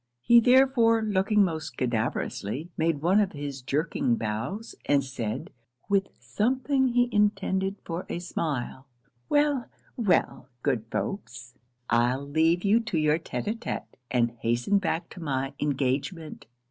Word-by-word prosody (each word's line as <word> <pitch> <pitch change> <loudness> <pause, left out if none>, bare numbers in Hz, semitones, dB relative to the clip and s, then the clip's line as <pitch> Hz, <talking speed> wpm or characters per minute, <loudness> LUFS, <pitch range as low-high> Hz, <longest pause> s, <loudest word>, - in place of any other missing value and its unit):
He 235 0 +7
therefore, 245 -2 +4
looking 210 0 +3
most 160 -5 -3
cadaverously, 125 - -2
made 160 -2 0
one 185 +5 +4
of 205 -3 +1
his 145 -2 -5
jerking 140 -2 0
bows, 115 - -4
and 140 -1 +3
said, 125 -5 -4 0.4
with 195 -1 +2
something 260 - +1
he 245 0 +3
intended 195 -2 +1
for 170 +2 -5
a - - -2
smile 145 -6 -4 0.4
'Well, 290 -4 +2 0.3
well, 165 - +1
good 125 -6 0
folks, 120 - -5 0.3
I'll 125 +4 +1
leave 160 +4 +2
you 210 +3 +4
to 220 -7 -3
your 155 +1 +2
tête - - -5
a 215 - +1
tête, 230 +1 -5 0.2
and 120 -2 +2
hasten 120 - +1
back 170 -3 -2
to - - -10
my 135 -2 -2
engagement. 145 +4 -2
165 Hz, 135 wpm, -27 LUFS, 130-210 Hz, 0.4 s, He